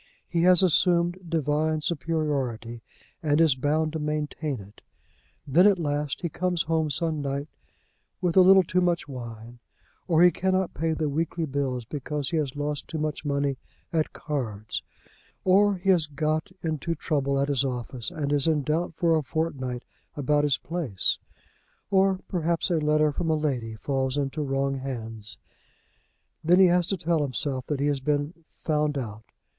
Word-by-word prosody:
He 170 Hz, -, 0 dB
has 180 Hz, +1 st, +5 dB
assumed 175 Hz, 0 st, +3 dB
divine 155 Hz, 0 st, 0 dB
superiority, 140 Hz, -8 st, -2 dB, 0.4 s
and 150 Hz, -2 st, +2 dB
is 160 Hz, -4 st, +5 dB
bound 150 Hz, +4 st, 0 dB
to 160 Hz, -, -2 dB
maintain 150 Hz, -2 st, -2 dB
it. 100 Hz, +1 st, -14 dB, 0.6 s
Then, 170 Hz, +8 st, +5 dB
at 200 Hz, -2 st, +4 dB
last, 145 Hz, -3 st, -2 dB
he 175 Hz, -, -1 dB
comes 175 Hz, +1 st, -1 dB
home 160 Hz, -1 st, 0 dB
some 155 Hz, +2 st, -1 dB
night 140 Hz, +1 st, -3 dB, 0.7 s
with 175 Hz, -2 st, 0 dB
a 190 Hz, -, +8 dB
little 190 Hz, +1 st, +7 dB
too 180 Hz, +2 st, +1 dB
much 175 Hz, -3 st, +1 dB
wine, 120 Hz, -3 st, -8 dB, 0.5 s
or 170 Hz, -1 st, +5 dB
he 180 Hz, -, +7 dB
cannot 185 Hz, 0 st, 0 dB
pay 165 Hz, 0 st, 0 dB
the 155 Hz, -1 st, -1 dB
weekly 160 Hz, +3 st, -1 dB
bills 135 Hz, -4 st, -2 dB
because 145 Hz, +1 st, -4 dB
he 165 Hz, -, +1 dB
has 145 Hz, -3 st, -1 dB
lost 145 Hz, 0 st, -3 dB
too 160 Hz, -, -5 dB
much 155 Hz, -1 st, -2 dB
money 140 Hz, -2 st, 0 dB, 0.4 s
at 160 Hz, -2 st, +1 dB
cards, 110 Hz, -8 st, -4 dB, 0.6 s
or 200 Hz, +2 st, +4 dB
he 190 Hz, +1 st, +2 dB
has 170 Hz, -5 st, +3 dB
got 155 Hz, +4 st, -1 dB
into 165 Hz, +1 st, -2 dB
trouble 140 Hz, -3 st, 0 dB
at 140 Hz, -, +1 dB
his 140 Hz, -2 st, +2 dB
office 125 Hz, -2 st, -4 dB
and 145 Hz, -2 st, -2 dB
is 145 Hz, +1 st, +2 dB
in 155 Hz, -3 st, +2 dB
doubt 160 Hz, +3 st, -1 dB
for 165 Hz, 0 st, +3 dB
a 155 Hz, -, +2 dB
fortnight 135 Hz, -4 st, -3 dB, 0.3 s
about 145 Hz, +1 st, +1 dB
his 145 Hz, -3 st, +2 dB
place, 155 Hz, -, -1 dB, 0.7 s
or 190 Hz, -1 st, +3 dB
perhaps 170 Hz, 0 st, 0 dB
a 170 Hz, -, +3 dB
letter 150 Hz, 0 st, +3 dB
from 165 Hz, +3 st, -2 dB
a 160 Hz, -, +3 dB
lady 130 Hz, -8 st, -2 dB
falls 130 Hz, +4 st, -1 dB
into 140 Hz, +2 st, -1 dB
wrong 135 Hz, -1 st, -1 dB
hands. 115 Hz, -5 st, -6 dB, 1.1 s
Then 175 Hz, +3 st, +5 dB
he 190 Hz, -, +8 dB
has 175 Hz, 0 st, +3 dB
to 195 Hz, -, 0 dB
tell 165 Hz, -1 st, +1 dB
himself 135 Hz, -1 st, -2 dB
that 145 Hz, -3 st, -1 dB
he 140 Hz, -, +1 dB
has 145 Hz, -2 st, +1 dB
been 145 Hz, +3 st, -1 dB, 0.2 s
"found 150 Hz, -2 st, -1 dB
out." 110 Hz, -4 st, -6 dB
150 Hz, 170 wpm, -26 LUFS, 135-165 Hz, 1.1 s, a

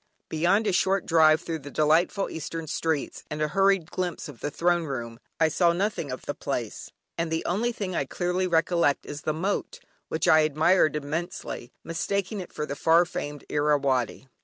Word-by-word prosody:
Beyond 180 Hz, +7 st, +2 dB
a 205 Hz, -, +2 dB
short 190 Hz, +1 st, +2 dB
drive 160 Hz, -1 st, +5 dB
through 165 Hz, -2 st, -4 dB
the 145 Hz, 0 st, -9 dB
delightful 160 Hz, +7 st, +2 dB
eastern 165 Hz, +1 st, -5 dB
streets, 155 Hz, -1 st, -2 dB
and 150 Hz, -, -4 dB
a 150 Hz, 0 st, 0 dB
hurried 195 Hz, -1 st, +2 dB
glimpse 180 Hz, -2 st, -3 dB
of 145 Hz, -5 st, -11 dB
the 145 Hz, -, -2 dB
Throne 175 Hz, +2 st, +1 dB
Room, 120 Hz, -5 st, -5 dB, 0.2 s
I 160 Hz, -, +5 dB
saw 170 Hz, +2 st, +3 dB
nothing 190 Hz, -4 st, -1 dB
of 130 Hz, -, -5 dB
the 145 Hz, -, -2 dB
place, 120 Hz, -7 st, -4 dB, 0.3 s
and 165 Hz, 0 st, 0 dB
the 160 Hz, -, -1 dB
only 220 Hz, +7 st, 0 dB
thing 195 Hz, -6 st, -4 dB
I 140 Hz, -, 0 dB
clearly 180 Hz, +5 st, -1 dB
recollect 170 Hz, -3 st, +2 dB
is 145 Hz, +1 st, -7 dB
the -, -, -1 dB
Moat, 190 Hz, +6 st, -2 dB, 0.3 s
which 160 Hz, -, -1 dB
I 155 Hz, -, +7 dB
admired 155 Hz, +2 st, +3 dB
immensely, 150 Hz, -4 st, -4 dB
mistaking 200 Hz, +5 st, -2 dB
it 185 Hz, -, -7 dB
for 150 Hz, -, -3 dB
the 140 Hz, -, -5 dB
far 165 Hz, +4 st, +4 dB
famed 145 Hz, -4 st, -6 dB
Irrawaddy! 140 Hz, -4 st, +1 dB
160 Hz, 185 wpm, -26 LUFS, 150-180 Hz, 0.3 s, I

